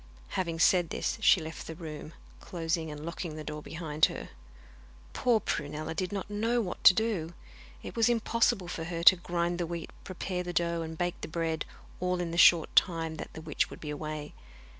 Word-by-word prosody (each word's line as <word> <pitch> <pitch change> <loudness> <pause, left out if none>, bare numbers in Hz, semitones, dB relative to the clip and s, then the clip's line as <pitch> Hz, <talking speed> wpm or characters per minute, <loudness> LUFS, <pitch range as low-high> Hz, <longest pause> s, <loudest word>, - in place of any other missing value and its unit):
Having 170 -3 -2
said 175 +1 +4
this - - -2
she 205 - +6
left 160 0 -7
the 160 - -6
room, 155 -1 -8 0.3
closing 165 -2 -2
and 150 0 -7
locking 170 -1 -5
the 155 - -6
door 150 0 -6
behind 160 -1 +1
her. - - -6 0.8
Poor 240 -3 +3
Prunella 155 -3 -3
did 180 +3 -2
not 200 -2 -3
know 225 +4 0
what 195 -6 -4
to 185 - +10
do. 190 -7 -1 0.5
It - - -7
was 230 0 +4
impossible 230 -4 +1
for 165 -1 -4
her 170 -1 -4
to 185 - +10
grind 175 0 -2
the 170 - -1
wheat, 170 -1 -5
prepare 185 -1 -4
the 175 0 -5
dough, 170 0 0
and 160 0 -6
bake 175 0 -2
the - - -4
bread, 160 -1 -2 0.3
all 180 0 0
in 175 -1 -2
the 170 - -4
short 170 -3 +6
time 165 -3 +2
that - - -7
the 160 - -8
witch 155 -2 -1
would - - -10
be 150 - -5
away. 150 0 -5
170 Hz, 200 wpm, -30 LUFS, 160-180 Hz, 0.8 s, to